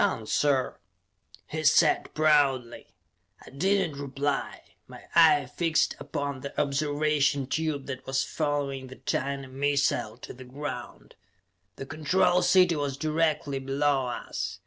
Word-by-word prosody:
"Done, 110 - 0
sir!" 135 +2 +1 0.7
he 155 +1 -5
said 155 +1 +3
proudly. 140 -6 +2 0.6
I - - -13
did 190 +5 +1
not 140 - -10
reply. 140 0 -3 0.3
My - - -12
eye 370 - +6
fixed 160 -3 0
upon 140 -3 -4
the 140 - -6
observation 145 -1 +1
tube 150 0 -2
that 130 -1 -7
was 135 0 +1
following 145 -3 -2
the 130 - -11
tiny 140 +1 -3
missile 135 -4 0
to - - -10
the 130 - -11
ground. 130 -1 -7 0.6
The 135 - -7
Control 160 +5 +2
City 180 -1 +4
was 145 -2 -2
directly 155 -2 0
below 135 0 0
us. 120 - -5
145 Hz, 130 wpm, -27 LUFS, 135-155 Hz, 0.7 s, eye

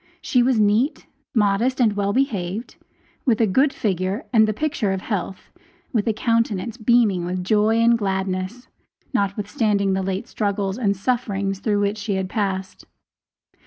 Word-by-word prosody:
She 250 - +2
was 245 -2 +2
neat, 215 +8 +2 0.3
modest, 220 +5 +2
and 225 -4 +3
well 200 0 0
behaved 210 -4 -2 0.5
with 235 -5 +2
a 225 - +4
good 265 +8 +3
figure 190 - -2
and 220 -2 +5
the - - +1
picture 230 -4 -1
of 190 - -3
health, 195 -3 -4 0.4
with 220 -3 0
a - - +4
countenance 230 -1 0
beaming 220 -6 +2
with 180 +1 -3
joy 215 +3 +2
and 230 +1 +5
gladness, 190 +3 -2 0.5
notwithstanding 200 -1 0
the 190 - 0
late 190 +1 -3
struggles 200 0 -2
and 200 -5 +1
sufferings 200 -4 -1
through 205 -1 0
which 205 +1 0
she 205 -1 -2
had 190 -1 -2
passed. 190 -3 -3
205 Hz, 155 wpm, -22 LUFS, 195-230 Hz, 0.5 s, and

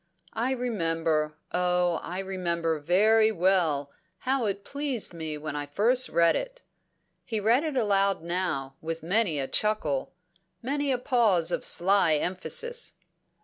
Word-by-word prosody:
I 235 +3 -1
remember, 165 -10 -1 0.2
oh 180 -1 +1
I 180 - -6
remember 170 -4 -2
very 215 +8 +3
well, 170 -7 +1 0.3
how 260 +1 -1
it 200 0 -3
pleased 280 -9 -2
me 160 -2 -5
when 150 0 -6
I 145 0 -4
first 240 - +2
read 170 0 +3
it." - - -5 0.6
He 220 -2 -3
read 230 +7 +3
it 310 -3 -3
aloud 200 -6 +1
now, 170 -6 -2
with 165 0 -5
many 180 -3 +1
a 135 - -2
chuckle, 185 -11 0 0.5
many 280 +3 -1
a 255 - +1
pause 230 - +2
of - - -2
sly 180 -3 +4
emphasis. 330 - -2
185 Hz, 140 wpm, -27 LUFS, 165-230 Hz, 0.6 s, sly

